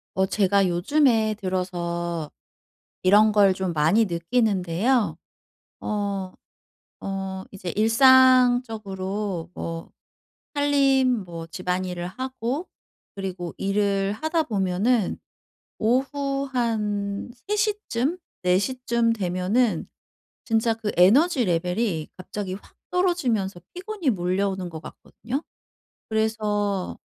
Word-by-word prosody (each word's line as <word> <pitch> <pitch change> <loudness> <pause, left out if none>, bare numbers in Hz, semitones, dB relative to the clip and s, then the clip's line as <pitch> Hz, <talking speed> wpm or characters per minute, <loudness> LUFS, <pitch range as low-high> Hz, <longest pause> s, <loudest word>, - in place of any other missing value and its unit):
어 190 0 +3
제가 200 -1 +2
요즘에 220 - +2
들어서 175 -4 -3 0.7
이런 205 +4 +6
걸 200 -2 +5
좀 190 -2 -2
많이 165 +9 +3
느끼는데요. 200 +4 +1 0.7
어, 200 -3 -2 0.7
어 195 -1 -4
이제 185 -3 -6
일상적으로 225 -6 +3
뭐 165 -2 -6 0.6
살림 275 -5 +3
뭐 165 -2 -7
집안일을 180 +1 -3
하고 260 - -4 0.5
그리고 185 -3 -5
일을 195 0 0
하다 315 +7 0
보면은 205 -1 0 0.6
오후 275 +4 0
한 210 -4 -1 0.2
3 420 - +1
시쯤, 405 - -1 0.2
4 180 0 +3
시쯤 235 0 0
되면은 185 +1 0 0.6
진짜 225 0 +1
그 220 -2 -4
에너지 250 - +5
레벨이 180 -1 -1
갑자기 185 +1 -5
확 200 - -13
떨어지면서 260 - 0
피곤이 370 -4 -2
몰려오는 190 -1 -1
것 160 -1 -7
같거든요. 255 +6 -6 0.7
그래서 210 -3 -1
205 Hz, 205 characters per minute, -24 LUFS, 185-250 Hz, 0.7 s, 이런